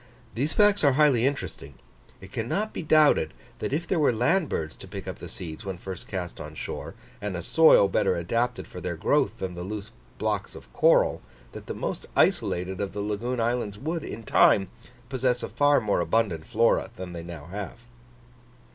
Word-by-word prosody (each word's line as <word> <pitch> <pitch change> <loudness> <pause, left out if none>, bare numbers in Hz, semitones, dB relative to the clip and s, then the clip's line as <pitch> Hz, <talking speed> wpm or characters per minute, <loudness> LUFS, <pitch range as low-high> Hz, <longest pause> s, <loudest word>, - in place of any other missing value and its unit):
These 140 +7 -1
facts 205 -3 +4
are 140 -2 +5
highly 135 -4 +4
interesting. 75 - -5 0.5
It 95 0 -12
cannot 160 - -2
be - - -4
doubted 155 -2 +4 0.2
that - - -3
if 160 +5 -1
there 180 - +1
were 145 - +4
land 125 - +2
birds 80 -1 -3
to - - -11
pick - - -8
up - - -6
the - - -8
seeds 80 +2 -7
when 95 -2 -5
first 95 0 -7
cast 90 -2 -5
on - - -8
shore, - - -6 0.3
and 100 -3 -3
a 85 - -5
soil 160 - +6
better 95 - +1
adapted 115 +8 -1
for 90 - -9
their 85 0 -3
growth 115 - +1
than 95 -4 -4
the 90 - -7
loose 100 +2 -6 0.3
blocks - - -2
of - - -13
coral, - - +4 0.3
that - - -10
the - - -4
most - - -4
isolated 90 +2 +1
of 100 - -3
the 105 - -5
lagoon 110 +5 -2
islands 115 -3 -1
would 160 +6 -3
in 115 - -7
time 95 -2 +4 0.4
possess 125 -1 0
a - - -3
far 145 0 +4
more 105 -5 0
abundant 85 -2 0
Flora 115 +2 +2
than 90 -1 -7
they 85 - -5
now 85 -3 -8
have. 100 +5 -7
110 Hz, 190 wpm, -26 LUFS, 90-135 Hz, 0.5 s, soil